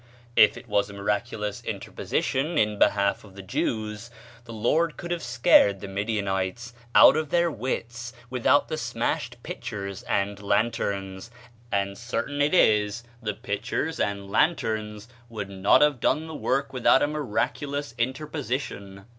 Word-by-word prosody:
If 105 - +6
it - - -11
was 105 -1 +1
a - - -9
miraculous 105 +1 -2
interposition 150 +5 -2
in 105 -3 +1
behalf 100 0 +2
of 100 -3 -15
the 100 - -9
Jews, 105 +3 -3 0.4
the 115 - -10
Lord 150 +9 +1
could 175 - -6
have 175 -1 -1
scared 120 -5 +4
the 100 - -7
Midianites 100 +2 -2 0.2
out - - +9
of 155 -1 -1
their 170 +1 +2
wits 120 0 -4 0.2
without 125 +3 +2
the 155 - -3
smashed - - -2
pitchers 100 -2 -6
and 100 +1 0
lanterns; 100 -2 -1 0.4
and 100 +1 -1
certain 125 +4 -3
it 150 +5 +3
is 105 - +3 0.2
the 105 -3 -3
pitchers 145 +10 -3
and 100 -1 -2
lanterns 110 -9 0 0.2
would 105 -4 -5
not 95 +7 +4
have 150 -4 +2
done 155 +6 +1
the 160 - -8
work 140 -2 -1
with 125 -2 -2
out 135 - +6
a - - +3
miraculous 145 -1 -2
interposition. 125 -7 -3
110 Hz, 145 wpm, -26 LUFS, 100-140 Hz, 0.4 s, out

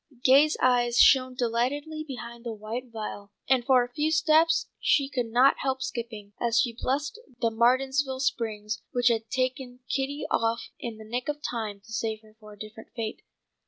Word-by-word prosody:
Gay's 285 +4 +5
eyes 240 -1 +3
shone 255 -1 +6
delightedly 260 +6 -1
behind 235 -5 -8
the 230 -2 -5
white 220 +4 -5
veil, 210 -2 -7 0.2
and 260 -2 +3
for 255 -1 +4
a 245 0 -9
few 300 +4 0
steps 320 +1 +3
she 280 -2 +2
could 255 -4 -2
not 250 +4 +4
help 265 -1 -1
skipping, 220 -4 -6
as 235 -1 +2
she 240 -2 +1
blessed 285 - -2 0.2
the 230 -1 +1
Martinsville 260 +3 +2
Springs, 220 -5 -2
which 245 -1 +2
had 225 -1 -1
taken 255 0 -2
Kitty 275 +2 -2
off 230 +1 0
in 230 -2 -6
the 220 - -11
nick 245 +5 -3
of 295 0 -2
time 215 -4 -4
to 225 +2 -13
save 220 0 -2
her 215 0 -20
for 215 -1 -13
a - - -16
different 215 +1 -10
fate. 225 -2 -4
245 Hz, 180 wpm, -27 LUFS, 225-265 Hz, 0.2 s, shone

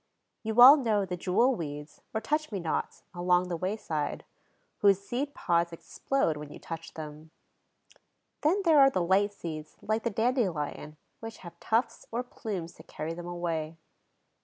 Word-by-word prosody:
You 220 +1 -1
all 270 +5 +11
know 220 -7 +1
the 180 -1 -4
jewel 190 +9 +2
weeds, 150 -5 -7
or 220 - -1
touch 305 +6 -1
me 200 - -2
nots, 165 -3 -3
along 180 0 +2
the 175 - -1
wayside, 165 -5 -3 0.5
whose 200 -2 +5
seed 255 +8 -4
pods 170 -1 +1
explode 165 - -1
when 150 0 -8
you - - -9
touch 165 0 -8
them. 155 0 -8 1.1
Then 365 +7 +2
there 320 -3 +6
are 270 -1 +8
light 190 -1 +2
seeds, 155 -6 -7
like 220 +1 -1
the 235 - -1
dandelion, 195 - -1 0.2
which 225 0 -8
have 175 - -11
tufts 230 +1 -1
or 240 +2 -1
plumes 195 -8 -6
to - - -13
carry 155 +2 -5
them 175 +1 -7
away. 165 -2 -3
185 Hz, 160 wpm, -29 LUFS, 165-230 Hz, 1.1 s, all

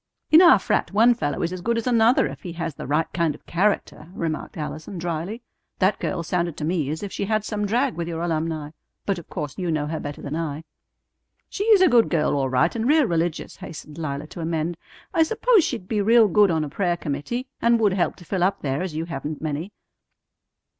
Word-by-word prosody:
"In 315 +2 +9
our 345 -2 +8
frat - - 0
one 225 +4 +5
fellow 145 - -2
is 170 +2 -1
as 185 - -6
good 235 +4 0
as 230 - -2
another 235 0 +4
if - - -6
he 175 -3 -7
has 165 -1 -4
the 135 - -8
right 150 +3 +2
kind 170 -4 0
of - - -19
character," 175 -4 -1
remarked 160 -1 -4
Allison 155 +4 -6
dryly. 175 +7 -4 0.3
"That 195 +1 +2
girl 170 -3 -2
sounded 170 -1 -1
to 150 - -3
me 160 -4 0
as 160 +6 -4
if 200 - -5
she - - -3
had 215 0 0
some 210 -2 -2
drag 245 +5 +1
with 170 -1 -4
your 165 0 -3
alumni. 160 -2 -2 0.3
But 195 -3 -1
of 170 - -14
course 150 -4 -5
you 180 -2 -2
know 155 -2 0
her 160 +1 -3
better 145 0 -6
than 145 +2 -5
I." 160 -2 -3 0.9
"She 405 - -3
is 430 -4 +6
a 370 - +7
good 240 -6 +4
girl 155 -3 +1
all 135 -2 0
right 130 - +2
and 230 +1 -1
real 300 0 +5
religious," 170 -3 -2
hastened 155 -1 -9
Lila 145 -2 -3
to 165 - -9
amend. 165 +1 -1 0.4
"I 330 - +3
suppose 445 +4 +4
she'd 225 -11 -3
be 210 -1 0
real 225 +2 +5
good 205 +1 +4
on 160 -2 +1
a 150 - -4
prayer 175 +2 0
committee, 165 - -3 0.2
and 235 0 +4
would 210 -4 +3
help 185 -2 0
to 175 - -15
fill 185 +2 -2
up 190 +3 +1
there, 135 +1 -1
as 180 -4 -4
you 160 +1 -2
haven't 150 -2 -5
many." 155 +5 -4
175 Hz, 230 wpm, -23 LUFS, 155-215 Hz, 0.9 s, In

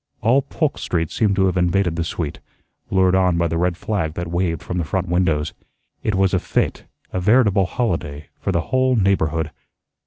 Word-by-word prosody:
All 125 +5 +4
Polk 145 +2 -2
Street 80 -3 -1
seemed 105 -3 +1
to 95 -1 +3
have 95 - +1
invaded 90 0 +1
the 85 - -1
suite, 80 -2 -4 0.5
lured 95 -1 +3
on 90 -2 +3
by 85 0 +2
the 85 0 -1
red 90 0 0
flag 90 -7 -2
that 85 -1 -4
waved 85 -3 -1
from 90 0 -3
the - - 0
front 95 +3 -2
windows. 85 -4 +1 0.5
It 105 - 0
was 95 0 +2
a 95 - +3
fete, - - -1 0.3
a 95 - 0
veritable 105 -1 +3
holiday, 80 - -3
for - - -2
the 85 -3 +1
whole 130 +5 +1
neighborhood. 80 -7 +1
90 Hz, 190 wpm, -21 LUFS, 85-100 Hz, 0.5 s, All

